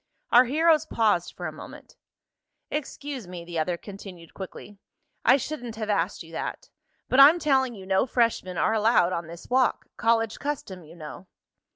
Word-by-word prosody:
Our 245 +2 +7
heroes 315 +3 +3
paused 210 -6 +1
for - - -6
a - - -3
moment. - - -12 0.8
"Excuse 285 -5 -5
me," 175 -1 -8
the 170 -1 -4
other 170 +2 -1
continued 190 -4 -11
quickly. 195 +1 -9 0.4
"I 255 - +6
shouldn't 245 -4 -5
have 215 -1 -2
asked 185 -1 -1
you 165 - -15
that. 165 - -5 0.4
But 255 - +2
I'm 290 +5 +9
telling 265 -6 +1
you 190 -2 -10
no 190 +5 +2
freshmen 230 -7 0
are 220 - +2
allowed 215 -5 +3
on 170 -1 -3
this 170 +1 -11
walk. 255 0 +1
College 225 -1 +1
custom, 255 - -5
you 160 +2 -14
know." 170 +3 -10
215 Hz, 170 wpm, -26 LUFS, 180-260 Hz, 0.8 s, I'm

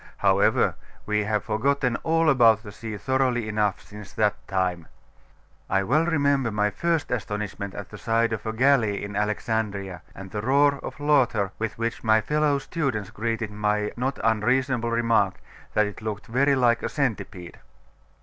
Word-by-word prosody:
However, - - +3 0.3
we 105 -1 0
have 105 -1 0
forgotten 125 +3 0
all 165 0 +1
about 115 -6 +5
the 105 - -9
sea 110 0 -7
thoroughly 130 -2 0
enough 105 -2 0
since 105 -2 -11
that 105 -2 +2
time. 90 -4 -1 0.8
I 95 0 +2
well 150 - +2
remember 140 -6 +2
my 105 -1 0
first 165 - -1
astonishment 105 -3 -4
at 100 -1 -7
the 105 - -9
side 115 0 +1
of 110 - -4
a - - 0
galley 115 -4 +2
in 100 0 -6
Alexandria, 105 -3 -2
and 95 0 -9
the 105 - -3
roar 140 +4 +3
of - - -8
laughter 125 -9 +2
with 110 0 -3
which 115 +1 -3
my 110 -1 +4
fellow 150 +4 +1
students 135 - -3
greeted 115 -1 -3
my 105 0 0
not 130 +3 -2
unreasonable 120 +2 +1
remark, 115 -1 +1 0.4
that 105 - +4
it 105 +1 -7
looked 105 -2 -5
very 140 +4 +2
like 120 -3 +3
a - - -2
centipede. 105 - -3
110 Hz, 160 wpm, -25 LUFS, 105-130 Hz, 0.8 s, about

